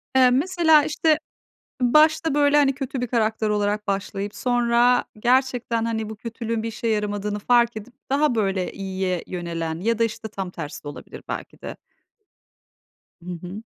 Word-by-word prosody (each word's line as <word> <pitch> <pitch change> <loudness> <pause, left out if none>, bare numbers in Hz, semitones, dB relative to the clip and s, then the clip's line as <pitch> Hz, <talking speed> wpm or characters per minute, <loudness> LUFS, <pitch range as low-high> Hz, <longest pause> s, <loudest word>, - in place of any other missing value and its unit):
Eee, 260 -1 +6
mesela, 320 +3 +4
işte, 310 +1 +2 0.6
başta, 305 +4 +4
böyle, 290 0 +4
hani, 280 -2 +4
kötü 270 -1 -4
bir 250 - -1
karakter 220 -2 0
olarak 210 0 0
başlayıp 200 0 -3
sonra 245 0 +2
gerçekten, 245 -1 +1
hani, 220 -2 -2
bu 220 - -7
kötülüğün 230 0 -4
bir 230 - -3
işe 225 +1 -5
yaramadığını 210 -1 -1
fark 235 +1 +3
edip 220 +3 -9 0.2
daha, 285 -1 +2
böyle, 195 -4 -1
iyiye 190 -2 -3
yönelen 165 -2 -4
ya 230 +3 0
da, 230 - +3
işte, 220 0 -4
tam 195 -3 -5
tersi 155 -5 -7
de - - -6
olabilir, 145 - -10
belki - - -6
de. - - -7 1.5
Hı - - -7
hı. 190 +5 -8
230 Hz, 155 wpm, -23 LUFS, 205-250 Hz, 1.5 s, Eee